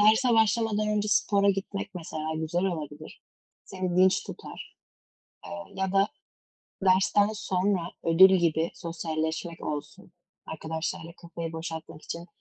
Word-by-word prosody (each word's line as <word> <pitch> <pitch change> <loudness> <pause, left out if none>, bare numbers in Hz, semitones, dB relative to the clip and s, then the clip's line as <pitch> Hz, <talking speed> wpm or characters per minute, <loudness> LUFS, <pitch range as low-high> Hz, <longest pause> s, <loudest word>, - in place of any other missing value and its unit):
derse 220 +3 +5
başlamadan 220 -1 +2
önce 210 0 0
spora 200 +1 +3
gitmek 195 0 -4
mesela 160 -2 -4
güzel 165 +3 -1
olabilir, 155 -5 -5 0.4
seni 185 -2 -3
dinç 185 +1 +4
tutar, - - -9 0.7
eee, 200 0 -8
ya 190 -1 -1
da 195 +1 +4 0.8
dersten 195 +2 +4
sonra 185 -3 0
ödül 190 +3 +7
gibi 165 -1 +1
sosyalleşmek 165 0 -3
olsun, 145 -1 -6 0.3
arkadaşlarla 160 +2 -4
kafayı 170 -1 -6
boşaltmak 160 -1 -6
için 170 +1 -6
180 Hz, 115 wpm, -28 LUFS, 160-200 Hz, 0.8 s, ödül